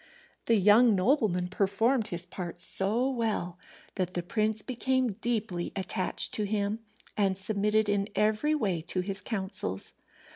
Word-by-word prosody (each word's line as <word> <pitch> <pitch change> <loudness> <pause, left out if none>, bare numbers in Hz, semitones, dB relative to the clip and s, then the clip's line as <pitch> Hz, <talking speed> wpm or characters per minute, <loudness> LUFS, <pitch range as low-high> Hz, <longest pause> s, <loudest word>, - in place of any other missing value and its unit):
The 230 - +4
young 210 +3 +5
nobleman 190 -4 +1
performed 210 +5 +1
his 175 0 -4
part 175 -1 -7
so 210 +7 +3
well 220 -8 -2 0.3
that 185 -1 -3
the 175 - -1
prince 215 +3 -1
became 255 -1 0
deeply 215 -7 -2
attached 185 -1 +1
to 210 - -1
him, 205 +1 -1 0.4
and 195 -2 +1
submitted 210 +2 +1
in 205 -1 0
every 215 +9 +2
way 195 - -1
to 185 - -1
his 195 +2 -4
counsels. 190 - -3
205 Hz, 140 wpm, -29 LUFS, 185-225 Hz, 0.4 s, young